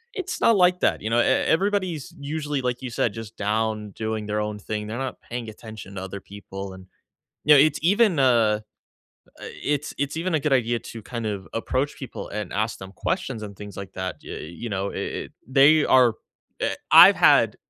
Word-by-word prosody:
it's 370 Hz, -3 st, -4 dB
not 230 Hz, -, +5 dB
like 180 Hz, -1 st, +4 dB
that, -, -, +1 dB
you 110 Hz, -, -3 dB
know? 120 Hz, -, +3 dB
E -, -, +3 dB
everybody's 185 Hz, -4 st, +1 dB
usually, 145 Hz, -1 st, -3 dB
like 125 Hz, 0 st, -2 dB
you 130 Hz, -, -5 dB
said, 115 Hz, -2 st, -1 dB
just 115 Hz, 0 st, -9 dB
down 105 Hz, 0 st, -1 dB
doing 110 Hz, 0 st, -4 dB
their 105 Hz, 0 st, -2 dB
own 105 Hz, 0 st, -3 dB
thing, 105 Hz, +1 st, -4 dB
they're 115 Hz, +2 st, -5 dB
not 135 Hz, -1 st, -5 dB
paying 120 Hz, -2 st, -6 dB
attention 110 Hz, -2 st, -10 dB
to 95 Hz, -, -5 dB
other 95 Hz, +1 st, -6 dB
people 95 Hz, -1 st, -8 dB
and, 95 Hz, 0 st, -13 dB, 0.6 s
you 150 Hz, -, +7 dB
know, 145 Hz, -, +7 dB
it's 150 Hz, 0 st, +3 dB
even, 200 Hz, -1 st, +3 dB
uh 115 Hz, -5 st, +3 dB, 0.8 s
uh, -, -, -8 dB, 0.2 s
it's 145 Hz, 0 st, -1 dB
it's 140 Hz, +2 st, -2 dB
even 170 Hz, +1 st, -1 dB
a 155 Hz, -, +2 dB
good 150 Hz, 0 st, 0 dB
idea 120 Hz, -2 st, +2 dB
to 115 Hz, -1 st, -10 dB
kind 115 Hz, 0 st, -5 dB
of 100 Hz, -4 st, -4 dB
approach 130 Hz, +5 st, -2 dB
people 135 Hz, -, -7 dB
and 105 Hz, -3 st, -5 dB
ask 110 Hz, +2 st, -1 dB
them 95 Hz, 0 st, -9 dB
questions 125 Hz, -, -3 dB
and 100 Hz, -1 st, -7 dB
things 105 Hz, +1 st, -10 dB
like 95 Hz, -1 st, -8 dB
that, 95 Hz, 0 st, -4 dB
ya -, -, -7 dB
uh, -, -, -6 dB, 0.2 s
you 120 Hz, -, -3 dB
know, 100 Hz, -1 st, -2 dB
i -, -, -8 dB
it -, -, -4 dB
they 140 Hz, +4 st, +5 dB
are 125 Hz, -3 st, +5 dB, 0.5 s
uh -, -, +2 dB, 0.2 s
I've -, -, +9 dB
had -, -, +5 dB
115 Hz, 210 wpm, -24 LUFS, 105-145 Hz, 0.8 s, I've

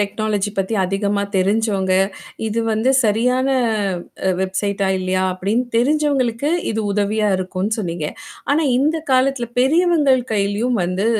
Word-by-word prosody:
Technology 205 Hz, 0 st, -1 dB
பத்தி 195 Hz, +4 st, -1 dB
அதிகமா 200 Hz, +2 st, -1 dB
தெரிஞ்சவங்க. 195 Hz, -1 st, +1 dB, 0.5 s
இது 220 Hz, +1 st, -1 dB
வந்து 220 Hz, +4 st, +1 dB
சரியான 250 Hz, +5 st, +2 dB, 0.8 s
அ -, -, +3 dB
வெப்சைட்டா 195 Hz, +1 st, -1 dB
இல்லையா 185 Hz, 0 st, -1 dB
அப்படின்னு 200 Hz, +7 st, -1 dB
தெரிஞ்சவங்களுக்கு 280 Hz, -1 st, +1 dB, 0.2 s
இது 220 Hz, -, -1 dB
உதவியா 210 Hz, +1 st, 0 dB
இருக்கும்ன்னு 185 Hz, +4 st, -2 dB
சொன்னீங்க. 170 Hz, -5 st, -3 dB, 0.4 s
ஆனா 300 Hz, +3 st, +3 dB, 0.2 s
இந்த 305 Hz, +4 st, +1 dB, 0.2 s
காலத்தில 255 Hz, -2 st, +1 dB
பெரியவங்கள் 300 Hz, -2 st, +3 dB
கையிலயும் 210 Hz, +3 st, 0 dB
வந்து 185 Hz, +4 st, -1 dB
215 Hz, 120 wpm, -19 LUFS, 195-255 Hz, 0.8 s, அ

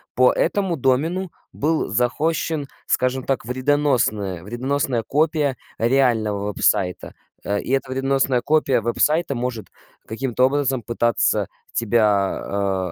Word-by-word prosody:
по 125 Hz, 0 st, +5 dB
этому 195 Hz, -4 st, 0 dB
домену 160 Hz, +8 st, 0 dB, 0.2 s
был 155 Hz, +2 st, 0 dB
захостщен, 145 Hz, +6 st, 0 dB, 0.2 s
скажем 130 Hz, 0 st, 0 dB
так, 135 Hz, -5 st, -2 dB
вредоносная 125 Hz, -, 0 dB
вредоносная 125 Hz, +2 st, -1 dB
копия 150 Hz, -2 st, +1 dB, 0.2 s
реального 115 Hz, -5 st, +2 dB
веб-сайта. 95 Hz, -2 st, 0 dB, 0.3 s
Э, 100 Hz, 0 st, -1 dB
и -, -, -5 dB
эта 135 Hz, -1 st, 0 dB
вредоносная 135 Hz, -1 st, +1 dB
копия 140 Hz, -3 st, +2 dB
веб-сайта 150 Hz, +7 st, +1 dB
может 120 Hz, -4 st, -4 dB, 0.4 s
каким-то 125 Hz, +2 st, 0 dB
образом 135 Hz, -3 st, 0 dB
пытаться 120 Hz, +1 st, +1 dB, 0.3 s
тебя, 100 Hz, -4 st, 0 dB
130 Hz, 105 wpm, -22 LUFS, 110-140 Hz, 0.4 s, по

